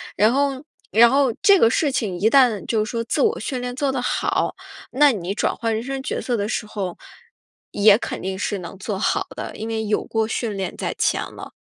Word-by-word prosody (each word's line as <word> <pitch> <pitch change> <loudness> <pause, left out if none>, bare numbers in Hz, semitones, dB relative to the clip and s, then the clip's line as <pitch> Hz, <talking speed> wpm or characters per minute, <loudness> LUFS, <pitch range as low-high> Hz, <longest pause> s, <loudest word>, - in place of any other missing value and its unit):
然 215 +2 +4
后 275 -1 0 0.3
然 235 +2 +7
后 270 -4 +3
这 400 -3 +6
个 225 - +5
事 285 +4 +1
情 210 -9 -2
一 215 +4 +3
旦 240 -8 +4
就 215 -2 0
是 - - -6
说 230 -1 -2
自 - - -1
我 460 +1 +2
训 260 -3 -3
练 245 0 -4
做 275 +1 0
得 265 -2 -2
好， - - -1 0.4
那 285 +2 +5
你 195 -3 -3
转 - - 0
换 230 -1 -1
人 225 - -3
生 270 0 -4
角 - - -3
色 245 -3 -1
的 205 - -1
时 230 - -2
候， 190 -5 -5 0.7
也 205 0 +5
肯 - - -5
定 190 0 -4
是 205 -2 -2
能 175 +2 -9
做 195 +1 -4
好 - - 0
的， - - -6
因 220 - -5
为 220 -1 -2
有 210 - 0
过 220 -1 -1
训 220 -2 -3
练 190 - -4
在 - - -3
前 - - +1
了。 - - -10
225 Hz, 250 characters per minute, -22 LUFS, 210-265 Hz, 0.7 s, 然